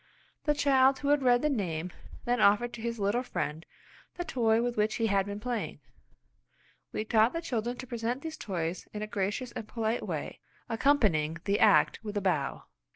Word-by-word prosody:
The 295 -1 +2
child 270 -2 +4
who 285 - -2
had 290 -1 +4
read 245 0 +4
the 300 - +3
name 180 - -2 0.3
then 245 -1 +1
offered 220 +4 +4
to 230 - -7
his 235 0 -3
little 205 +5 +1
friend 160 -10 -3 0.5
the 350 - -3
toy 230 -7 +2
with 245 0 -1
which 215 +1 +1
he 230 - 0
had 200 -2 +2
been 205 0 -5
playing. 240 0 -3 1.1
We 215 - -3
taught 220 +1 +3
the 330 - -1
children 245 -5 -2
to 255 - -7
present 240 +1 -3
these 320 -1 -5
toys 175 - -4
in 210 0 -4
a - - -1
gracious 215 +4 -2
and 220 - -7
polite 225 0 -1
way, - - -4 0.3
accompanying 215 - +2
the 205 0 +1
act - - +4
with 210 -1 -4
a - - 0
bow. 160 -8 -1
225 Hz, 190 wpm, -30 LUFS, 205-250 Hz, 1.1 s, child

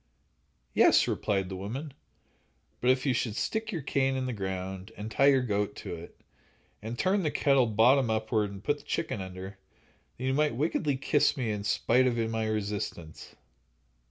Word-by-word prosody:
"Yes," - - +5
replied 95 -2 0
the 95 - -6
woman; 125 +10 -5 0.9
"but 125 - +1
if 130 +1 +3
you 135 - +3
should 115 -3 -1
stick 220 - -2
your 165 -7 -4
cane 135 -1 +1
in 130 -1 -1
the 125 - -2
ground 95 0 -5
and 105 +2 -6
tie 135 +5 +4
your 135 -2 +5
goat 105 -3 -1
to - - -6
it, 85 0 -10 0.6
and 115 +3 -5
turn 190 - +2
the 155 - 0
kettle 135 -4 +3
bottom 120 +4 +4
upward 110 -1 0
and 100 0 -10
put 145 0 +1
the - - -17
chicken 160 -11 -2
under, 95 +1 -8 0.6
then 130 - -5
you 130 - +1
might 150 -2 +1
wickedly 145 0 0
kiss 145 +2 +2
me 120 -4 -1
in 105 -1 -3
spite 125 +5 +2
of 120 -2 0
my 110 -1 -1
resistance." 100 -6 -4
115 Hz, 180 wpm, -29 LUFS, 100-135 Hz, 0.9 s, Yes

